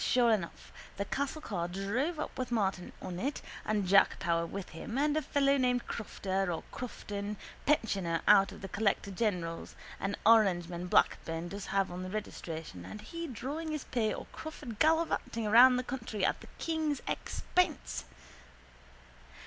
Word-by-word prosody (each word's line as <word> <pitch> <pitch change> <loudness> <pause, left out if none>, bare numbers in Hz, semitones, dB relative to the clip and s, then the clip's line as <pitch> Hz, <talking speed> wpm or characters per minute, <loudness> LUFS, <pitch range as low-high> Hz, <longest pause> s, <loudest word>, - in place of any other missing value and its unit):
Sure 240 -2 +4
enough 190 -6 -2 0.2
the 200 - -1
castle 280 +7 -2
car 175 -5 -2
drove 205 - -1
up - - -4
with 255 -2 -3
Martin 195 -5 0
on 175 -1 -4
it 275 +8 -1 0.2
and 210 -2 0
Jack 195 +2 +5
Power 170 -1 0
with 195 +2 -6
him 225 +9 -6
and 295 +1 +2
a 310 - +2
fellow 280 0 +3
named 250 -2 +2
Crofter 195 -4 -2
or 165 - -3
Crofton, 210 -4 -5 0.3
pensioner 195 - +2
out 195 -1 +7
of - - -11
the - - -3
collector 200 0 0
general's, 180 -5 -2 0.2
an 195 +1 -1
orangeman 180 -6 +4
Blackburn 165 -1 +2
does 200 +1 -6
have 195 -1 +1
on 180 +1 -5
the 185 - -5
registration 165 - -5
and 210 - -8
he 335 +10 -6
drawing 285 +6 -4
his 305 -3 -3
pay 225 -3 0
or - - -5
Crawford 290 -8 -7
gallivanting 310 -8 +2
around 245 +4 +8
the 250 - 0
country 230 -6 -2
at - - 0
the - - -11
king's 315 -3 -1
expense. 355 -6 -1
215 Hz, 160 wpm, -32 LUFS, 185-260 Hz, 0.3 s, around